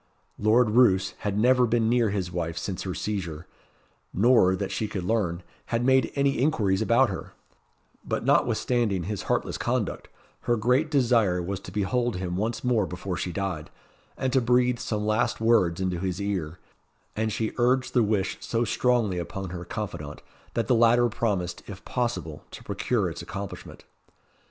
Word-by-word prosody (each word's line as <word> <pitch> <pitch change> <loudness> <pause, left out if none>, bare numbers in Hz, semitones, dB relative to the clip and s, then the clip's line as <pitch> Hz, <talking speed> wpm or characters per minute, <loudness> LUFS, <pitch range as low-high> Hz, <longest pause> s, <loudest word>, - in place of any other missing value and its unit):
Lord 110 +2 +4
Roos 105 -5 +4
had 100 -1 -2
never 125 +2 +4
been 115 0 +2
near 120 -1 +3
his 95 -3 -2
wife 85 -1 -3
since 95 0 -4
her 95 -2 -4
seizure 90 -6 -4 0.7
nor, 100 -3 +4
that 95 +1 -4
she 110 - -2
could 100 -3 -4
learn, 90 -4 -1 0.2
had 120 +1 0
made 130 -2 +3
any 140 -2 +1
inquiries 110 -9 +1
about 115 +2 +3
her; 85 -4 -7 0.7
but - - -3
notwithstanding 115 -7 +2
his 100 +2 -4
heartless - - 0
conduct, - - -2 0.4
her 120 -1 +2
great 125 +8 +2
desire 115 - +3
was 95 +2 -3
to 90 - -10
behold 105 +4 0
him 90 -1 -3
once 110 +5 -2
more 115 -6 +2
before 90 +1 -5
she 90 - -3
died, 90 -4 -3 0.5
and 130 -1 -1
to 130 - +4
breathe 125 0 +2
some 105 -1 -2
last 110 +3 +1
words 110 -7 +3
into 90 -2 -1
his 95 0 -2
ear; 90 -5 -3 0.6
and 110 0 -1
she 110 +1 -2
urged 125 +2 +2
the 125 - +4
wish 100 -3 0
so 115 +1 -1
strongly 115 -5 +1
upon 95 +1 -5
her 85 -1 -6
confidante, 85 -6 -6 0.3
that 115 - +1
the 130 - +2
latter 120 +1 +4
promised, 100 -8 -2
if - - -10
possible, 120 -11 -3
to - - -11
procure - - -1
its - - -6
accomplishment. 100 0 -8
105 Hz, 165 wpm, -26 LUFS, 95-120 Hz, 0.7 s, Lord